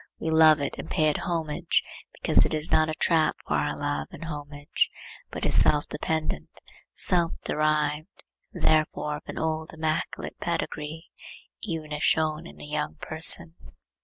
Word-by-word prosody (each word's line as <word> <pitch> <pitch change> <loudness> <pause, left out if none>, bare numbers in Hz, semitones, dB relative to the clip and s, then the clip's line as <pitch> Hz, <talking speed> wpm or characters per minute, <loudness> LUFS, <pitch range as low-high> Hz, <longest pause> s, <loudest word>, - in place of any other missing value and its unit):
We 160 - -2
love 160 -1 +6
it 140 - -3
and 160 - -7
pay 155 -3 +2
it 150 - -1
homage 165 -4 -1 0.3
because - - +2
it - - 0
is 155 +1 -2
not 155 0 +4
a 155 - -3
trap 160 0 +2
for - - -2
our 75 0 0
love 70 0 -2
and 165 - -9
homage, 145 -2 -2 0.4
but - - -5
is - - +4
self 150 -1 +3
dependent, 155 +1 -2 0.4
self 170 -2 +1
derived, 150 0 -1 0.3
and - - -8
therefore 155 -1 +1
of 150 - -14
an - - -7
old 160 0 -2
immaculate 160 0 -3
pedigree, 160 -2 -4 0.5
even 160 -6 -4
if 150 0 -4
shown 155 +1 +1
in - - -14
a - - -7
young 150 0 -2
person. 160 +1 +5
155 Hz, 160 wpm, -26 LUFS, 150-160 Hz, 0.5 s, love